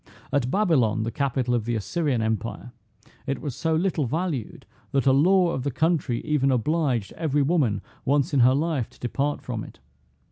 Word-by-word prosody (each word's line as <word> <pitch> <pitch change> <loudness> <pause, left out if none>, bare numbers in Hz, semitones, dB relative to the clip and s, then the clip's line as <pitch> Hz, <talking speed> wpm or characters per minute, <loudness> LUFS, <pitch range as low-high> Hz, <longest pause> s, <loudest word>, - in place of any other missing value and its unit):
At 130 -3 +1
Babylon, 130 - +2
the 115 - -2
capital 130 -1 -1
of 115 -3 0
the 120 0 -1
Assyrian 130 - -1
empire, 110 +2 -3 0.6
it 140 - -1
was 140 -5 -5
so 160 -1 0
little 165 -5 0
valued, 155 - -3 0.3
that 135 -1 +2
a 135 - +5
law 175 +5 +4
of 135 - -2
the 140 - -1
country 145 -4 0
even 150 -3 +2
obliged 130 -3 0
every 150 -3 0
woman 135 - +1 0.2
once 145 +3 +1
in 140 - +3
her 125 +2 +5
life 150 -5 -1
to - - -22
depart 140 +4 -2
from 115 -5 -4
it. - - -12
140 Hz, 180 wpm, -25 LUFS, 120-160 Hz, 0.6 s, a